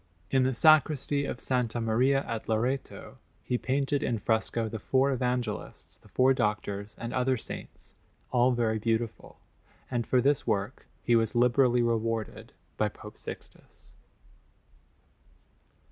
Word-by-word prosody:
In 135 - +4
the 130 0 +1
Sacristy 150 -1 +4
of 120 - -4
S. 125 -3 -1
Maria 120 +4 +2
at 115 -1 -5
Loreto 125 +5 -2 0.2
he 125 - -1
painted 140 +2 0
in 120 - 0
fresco 110 +1 0
the 110 0 -5
four 135 +6 +2
Evangelists, 125 -4 -3
the - - -21
four 130 +1 +3
Doctors, 105 -3 -2
and 115 +1 -5
other 130 0 +1
saints, - - -9 0.4
all 125 0 +4
very 115 -3 0
beautiful; 115 +1 -2 0.5
and 120 -2 -1
for 130 - +3
this 140 +2 +1
work 100 -3 -2 0.2
he 120 - +3
was 115 0 +1
liberally 125 0 +3
rewarded 115 -1 -2 0.3
by - - +1
Pope - - -12
Sixtus. - - -10
120 Hz, 130 wpm, -28 LUFS, 115-130 Hz, 0.5 s, In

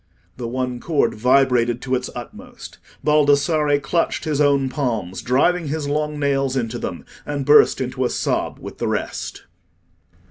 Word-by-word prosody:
The 120 -2 -5
one 125 0 -3
cord 155 +2 +1
vibrated 125 0 +2
to 130 - -3
its 125 0 -1
utmost. 120 -1 -10 0.2
Baldassarre 150 0 +3
clutched 165 +4 -1
his 150 -2 0
own 140 -2 +3
palms, 115 - -3
driving 155 +7 +1
his 150 0 -3
long 150 +1 -1
nails 135 -2 0
into 120 -1 -2
them, - - -5 0.2
and 145 -2 -4
burst 145 -1 +6
into 130 0 -2
a - - +1
sob - - -1
with - - -10
the - - -1
rest. - - -4
135 Hz, 150 wpm, -21 LUFS, 125-150 Hz, 0.2 s, burst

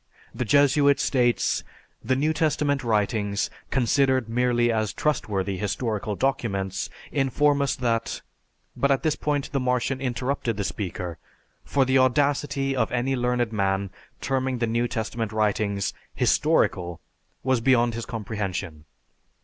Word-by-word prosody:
The 125 - -2
Jesuit 140 +3 +4
states, 120 -3 +1 0.4
"The 130 - +1
New 150 +4 +1
Testament 150 -3 +1
writings, 105 -2 0 0.2
considered 130 -1 +2
merely 120 0 +2
as 110 -3 0
trustworthy 100 -10 -1
historical 105 0 -2
documents, 100 -7 -1 0.2
inform 145 +1 +2
us 140 0 +1
that 115 -3 -1 0.3
" - - -45
but 140 - +1
at 135 -1 +2
this 155 -2 +2
point 145 -2 -2
the 140 - 0
Martian 125 +1 0
interrupted 125 -2 -2
the 100 - -1
speaker, 90 -4 -4 0.4
for 140 -2 +1
the 130 0 +3
audacity 135 +1 +1
of 120 -4 0
any 125 +2 0
learned 125 -2 0
man 95 -2 0 0.3
terming 130 -1 -1
the 120 - 0
New 115 +2 0
Testament 110 -1 -3
writings 105 -2 0 0.2
"historical" 90 -2 +1 0.4
was 130 -1 +2
beyond 120 -1 +3
his 115 0 -5
comprehension. 100 -8 -4
120 Hz, 135 wpm, -25 LUFS, 105-135 Hz, 0.4 s, Jesuit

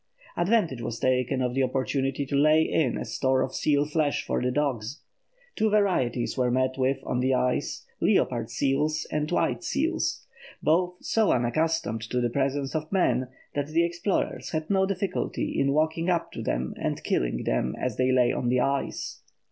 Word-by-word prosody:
Advantage 175 - +1
was 115 -1 -4
taken 130 +1 +1
of 125 -1 -1
the 135 - +1
opportunity 135 +1 0
to 140 - -3
lay 155 +3 +5
in 140 -7 +1
a - - -4
store 130 -1 +1
of 130 - -4
seal 145 -1 +2
flesh 150 -1 0
for - - -1
the 125 - +1
dogs. 130 -1 -2 0.5
Two 220 -1 +2
varieties 180 - +1
were 125 -2 +1
met 130 +1 +1
with 130 0 +1
on 125 - -1
the 130 +1 +2
ice, 125 0 -1 0.2
leopard - - +2
seals 150 +3 0
and 150 0 -1
white - - 0
seals, - - -1 0.3
both 175 +3 +2
so 220 -2 +2
unaccustomed 125 -1 0
to 120 +2 -2
the 120 -1 0
presence 135 +1 -1
of 155 -1 -3
man 130 -10 +2 0.3
that 145 -1 -1
the 165 +2 +2
explorers 170 +3 -2
had 155 +2 -3
no 190 -1 +3
difficulty 190 -1 -2
in 140 0 +2
walking 160 +3 +1
up 170 -2 0
to - - -6
them 65 +1 -2
and - - -3
killing - - 0
them 65 - 0
as 125 -4 -2
they 130 0 +2
lay 125 -1 +4
on 120 - -1
the 125 +1 +2
ice. 140 +2 -2
135 Hz, 180 wpm, -27 LUFS, 125-160 Hz, 0.5 s, lay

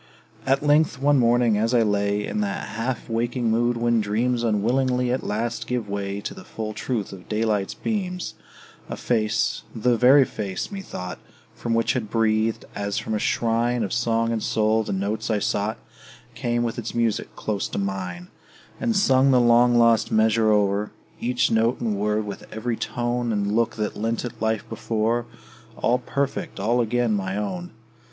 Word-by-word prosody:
At 135 +1 +2
length, 150 0 +3
one 145 0 +4
morning, 120 -2 +3
as 115 +3 +1
I 115 - +5
lay 100 0 0
In 215 - -2
that 200 -1 -3
half 115 +3 -3
waking 120 +1 0
mood 120 +1 +2
when 120 -1 +2
dreams 115 +4 0
Unwillingly 125 +3 +1
at 130 - -1
last 115 +3 -2
gave 125 -4 -2
way 100 0 -3
To - - -5
the 190 - -11
full 110 -8 -5
truth 110 -4 -3
of 95 -2 -12
daylight's 105 -2 0
beams, 185 -5 -3 0.6
A - - -3
face 110 -3 0
the 120 +2 +2
very 130 +3 +6
face, 100 - -4
methought, 175 - -6 0.3
From 115 -1 -2
which 115 - +2
had 115 -5 -3
breathed, 110 0 +1
as 100 0 -3
from - - -3
a 105 - 0
shrine 115 +2 +1
Of 100 - -3
song 115 -1 +1
and 115 -1 -1
soul, 110 +1 +2
the - - -5
notes 105 +4 -2
I 110 - +2
sought 105 +1 -1 0.6
Came 120 0 -1
with 115 -1 -2
its - - -5
music 115 -2 -1
close 105 -2 -2
to - - -6
mine; 95 -3 -4 0.5
And 230 - 0
sung 135 -9 +4
the 130 -2 +5
long 120 0 +5
lost 115 -2 +4
measure 110 0 +3
o'er, 105 0 +2 0.3
Each 125 +1 +1
note 115 +2 +2
and 110 -3 -1
word, 105 +1 0
with 100 -1 -8
every 115 +2 -2
tone 120 +1 -2
And 100 -1 0
look, 115 0 +1
that 105 -1 -2
lent 115 +3 -2
it 115 -2 -8
life 110 -1 0
before, 115 +1 -1 0.5
All 125 +1 +2
perfect, 140 -2 -3
all 120 +5 +2
again 120 0 +1
my 95 -1 -2
own! 175 - -3
115 Hz, 175 wpm, -24 LUFS, 105-120 Hz, 0.6 s, very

